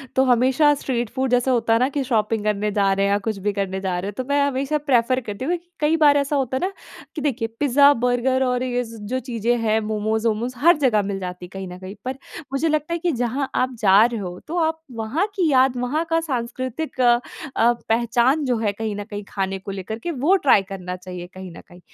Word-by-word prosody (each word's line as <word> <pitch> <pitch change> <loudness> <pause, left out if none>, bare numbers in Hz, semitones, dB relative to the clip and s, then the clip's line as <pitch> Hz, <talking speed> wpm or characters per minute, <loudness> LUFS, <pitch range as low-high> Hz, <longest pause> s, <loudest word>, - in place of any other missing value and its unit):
तो 265 - +4
हमेशा 260 +4 +4
street 240 -5 -2
food 260 -1 -2
जैसा 245 +1 +2
होता 230 -2 +2
है 230 - +3
ना 255 +2 +2
कि 285 0 -2
शॉपिंग 220 -3 0
करने 210 0 0
जा 200 -1 +2
रहे 195 0 +1
हैं 200 - +1
या 200 - +3
कुछ 220 -2 -1
भी 205 - +2
करने 195 -1 -2
जा 185 -2 -1
रहे 195 - -4
हैं - - -7
तो 255 - -1
मैं 285 0 +3
हमेशा 275 +2 0
प्रेफ़र 255 -3 +2
करती 215 +1 -6
हूँ 335 - 0
क्योंकि 345 0 -12
कई 310 +2 +2
बार 290 -1 +6
ऐसा 280 +1 0
होता 260 -2 0
है - - -4
ना? - - -6 0.4
कि 310 - -4
देखिए 260 -5 -1
पिज़्ज़ा-बर्गर 260 -2 +3
और 250 -1 0
ये 245 -1 -1
ज़ 230 0 -10
जो 255 +4 -1
चीज़ें 240 -1 -1
हैं 220 -1 +2
मोमोज़-वोमोज़ 220 +2 -1
हर 330 +6 +5
जगह 245 -8 +3
मिल 195 -1 -3
जाती 180 -1 -6
है - - -14
कहीं 195 -1 -6
न 180 0 -8
कहीं। 190 +2 -8
पर 260 +1 -2 0.4
मुझे 275 +4 +1
लगता 305 +2 -1
है 340 - -1
कि 345 +1 0
जहाँ 250 +1 -2
आप 255 0 +1
जा 200 0 +6
रहे 235 -2 -2
हो, 180 -2 -6
तो 335 +3 -6
आप 320 0 0
वहाँ 230 - -1
की 355 -5 +2
याद 260 -1 +4
वहाँ 265 +7 -1
का 330 0 +2
साँस्कृतिक 255 0 -4
अ, 240 -1 +5 0.4
पहचान 235 +4 +2
जो 250 -3 +1
है 220 -2 0
कहीं 215 0 -4
न 205 - -4
कहीं 205 0 -7
खाने 195 -1 -2
को 195 +1 -7
लेकर 195 +3 -5
के 345 - -4
वो 310 +6 +2
ट्राई 205 - +7
करना 180 -2 -5
चाहिए 180 -1 -8
कहीं 185 -1 -9
न - - -10
कहीं। 175 - -16
240 Hz, 240 wpm, -22 LUFS, 210-275 Hz, 0.4 s, ट्राई